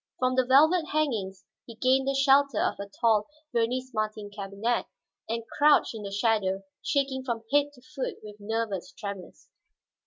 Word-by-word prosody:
From 255 0 +1
the 255 -1 +2
velvet 315 +6 +5
hangings 220 -12 -1 0.2
he 230 - -10
gained 260 +3 +2
the 275 - +1
shelter 275 +1 +4
of - - 0
a 200 0 -6
tall 220 -3 +3 0.3
Vernis 250 +3 0
Martin 215 -1 -3
cabinet 200 +4 -2 0.4
and 230 0 -2 0.2
crouched 295 -3 +5
in 220 - -7
the 200 - -5
shadow, 200 -2 +1 0.2
shaking 270 -2 0
from 235 -3 -3
head 290 0 +4
to 250 -3 -19
foot 275 -2 -5
with 210 -1 -10
nervous 215 -3 -3
tremors. 200 -3 -8
230 Hz, 160 wpm, -27 LUFS, 210-270 Hz, 0.4 s, velvet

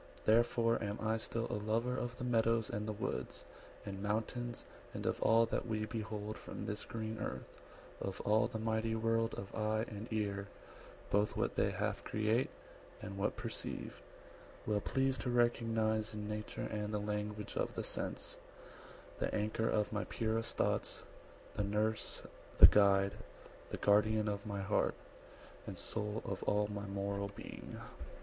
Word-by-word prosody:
Therefore 115 +1 +4
am 105 0 -2
I 110 0 +1
still 115 +1 -2
A 105 - -1
lover 115 +4 +1
of 120 -1 -3
the - - -5
meadows 115 -2 +2
and 105 +1 -2
the - - 0
woods, 105 - -3 0.4
And 100 -1 -5
mountains; 115 +3 -2 0.3
and - - -4
of - - 0
all 115 +1 +6
that 115 - -2
we 110 -1 0
behold 110 -1 -4
From - - -6
this 105 -1 -4
green 110 -1 -4
earth; 65 -9 -4 0.5
of 95 -1 -3
all 110 +3 +4
the 115 - -4
mighty 110 0 0
world 115 0 +1
Of 100 - -6
eye, 110 +1 +1
and 105 +1 -6
ear,–both 100 0 -2
what - - +1
they - - +2
half - - -1
create, 110 +4 +1 0.5
And 100 -3 -6
what 100 +1 0
perceive; 115 0 -5 0.6
well 105 -1 +1
pleased 135 +3 +1
to 130 - -1
recognise 115 -2 +2
In 105 0 -4
nature 105 0 -3
and 105 -1 -2
the 105 - +1
language 105 0 -3
of - - -1
the - - -2
sense, - - -4 0.8
The - - 0
anchor 110 +2 +1
of 105 0 +1
my 105 - 0
purest 115 0 -1
thoughts, - - 0 0.5
the 105 - 0
nurse, 105 +2 0 0.3
The - - +13
guide, 100 -1 +6 0.6
the - - -3
guardian 105 +1 +4
of 100 0 -2
my 100 -1 -2
heart, 100 +2 +2 0.7
and - - -5
soul 105 0 -3
110 - - -3
Of 95 - -3
all 105 0 +3
my 100 0 -4
moral 100 0 -1
being. 100 - -8
110 Hz, 160 wpm, -36 LUFS, 105-115 Hz, 0.8 s, The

